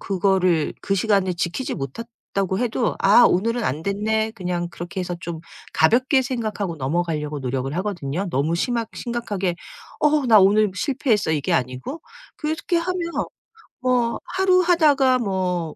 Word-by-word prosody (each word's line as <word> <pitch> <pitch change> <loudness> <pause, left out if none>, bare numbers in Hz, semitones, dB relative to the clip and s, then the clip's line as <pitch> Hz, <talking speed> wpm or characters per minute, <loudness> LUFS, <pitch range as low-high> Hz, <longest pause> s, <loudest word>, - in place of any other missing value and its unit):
그거를 185 -4 +1
그 195 - -1
시간에 195 -2 +2
지키지 175 +8 -3
못했다고 195 - -4
해도 240 -1 0
'아 205 +5 +6
오늘은 230 +6 0
안 145 +5 -2
됐네.' 220 +3 0
그냥 180 -5 -3
그렇게 175 +2 -6
해서 180 -1 -4
좀 170 -1 -6 0.3
가볍게 255 - +3
생각하고 215 - -3
넘어가려고 150 +1 -2
노력을 135 +2 -3
하거든요. 185 -3 -3
너무 145 +4 0
심하 235 +4 -1
심각하게 205 -7 -3 0.5
'어 300 -2 +3
나 225 -3 +7
오늘 205 +2 +4
실패했어.' 235 - 0
이게 150 -3 -1
아니고. 130 - -2 0.4
그래서 310 0 -2
그렇게 350 - +1
하면 345 0 -2 0.7
뭐 250 -2 +1
'하루 370 -1 +3
하다가 295 -7 +4
뭐 185 -6 -2
200 Hz, 330 characters per minute, -22 LUFS, 175-245 Hz, 0.7 s, 나